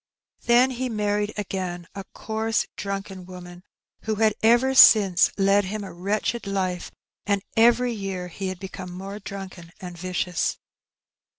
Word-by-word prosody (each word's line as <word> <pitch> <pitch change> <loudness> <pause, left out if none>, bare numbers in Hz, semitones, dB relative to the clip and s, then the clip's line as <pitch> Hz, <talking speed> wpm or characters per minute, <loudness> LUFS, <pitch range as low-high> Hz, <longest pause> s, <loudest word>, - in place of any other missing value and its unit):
Then 245 +2 +5
he 255 0 -3
married 210 -1 -1
again, 185 -3 -4
a 195 -1 -7
coarse 220 0 -2
drunken 195 -2 -5
woman, 180 -1 -11 0.4
who 220 -1 0
had 215 0 +3
ever 240 +4 +4
since 200 -8 +7
led 200 0 +3
him 210 +2 -4
a 195 - -8
wretched 205 +5 -2
life; 185 -3 -2 0.4
and 200 -1 +1
every 240 +2 +4
year 195 -4 -5
he 190 +3 -5
had 185 -1 -5
become 185 -1 -8
more 195 +3 -7
drunken 190 -4 -9
and 180 -3 -8
vicious. 180 0 -2
195 Hz, 140 wpm, -24 LUFS, 185-220 Hz, 0.4 s, since